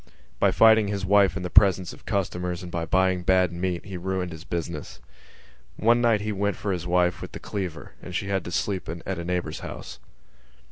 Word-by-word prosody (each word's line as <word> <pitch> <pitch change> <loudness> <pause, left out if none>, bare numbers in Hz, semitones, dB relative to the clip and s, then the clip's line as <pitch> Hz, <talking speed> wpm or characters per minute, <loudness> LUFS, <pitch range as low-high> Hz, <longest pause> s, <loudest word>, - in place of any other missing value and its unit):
By - - +4
fighting 110 -2 +6
his 100 -1 -2
wife 100 0 +4
in 95 - -4
the 90 - -4
presence 95 -3 +4
of - - -16
customers 90 -3 -2
and 90 - -8
by 85 -1 -2
buying 95 -1 +2
bad 90 0 +3
meat 90 -1 -2
he 95 -2 -6
ruined 90 0 -2
his 80 0 -9
business. 85 -2 -5 0.8
One 120 +2 +3
night 115 -3 +3
he 105 +1 -2
went 100 0 -1
for 100 - -3
his 90 -2 -3
wife 90 0 +2
with - - -8
the - - -6
cleaver 90 -7 -5
and 90 - -8
she 95 - -2
had 95 -2 0
to 85 - -5
sleep 95 -1 -2
in 85 +1 -6
a 95 -3 -3
neighbour's 90 0 -2
house. 60 - -8
95 Hz, 205 wpm, -25 LUFS, 90-100 Hz, 0.8 s, fighting